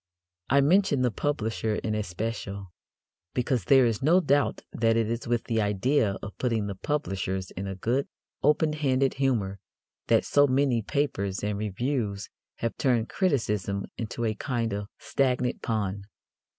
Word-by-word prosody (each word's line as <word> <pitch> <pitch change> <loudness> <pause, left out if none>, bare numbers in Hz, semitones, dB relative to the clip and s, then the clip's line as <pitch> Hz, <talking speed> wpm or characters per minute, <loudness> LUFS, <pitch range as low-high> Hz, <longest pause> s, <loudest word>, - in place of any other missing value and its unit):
I 140 +2 +5
mention 150 -3 +3
the 125 - +2
publisher 110 -3 -1
in 110 - -2
especial, 100 -1 -4 0.6
because 125 -5 0
there 135 -2 +6
is 115 -3 0
no 165 +7 +5
doubt 145 -5 +1
that 115 -1 +2
it 115 -2 +2
is 115 +1 -3
with 120 -1 +1
the 115 -1 0
idea 105 +1 +1
of 100 - -7
putting 115 -4 0
the 100 - -3
publishers 95 -6 -2
in 95 +2 -5
a 95 - -4
good, 120 +8 0 0.3
open 150 +1 +3
handed 135 -3 +1
humour 105 -8 +1 0.5
that - - +3
so 145 0 +4
many 130 -3 +2
papers 100 -8 -1
and 105 0 -1
reviews 105 0 -2 0.3
have 115 - -3
turned 120 -4 +1
criticism 105 - 0
into 115 +1 -3
a 110 - +1
kind 115 -1 -2
of 100 0 -3
stagnant 130 -3 0
pond. 100 -3 -2
115 Hz, 150 wpm, -27 LUFS, 100-135 Hz, 0.6 s, there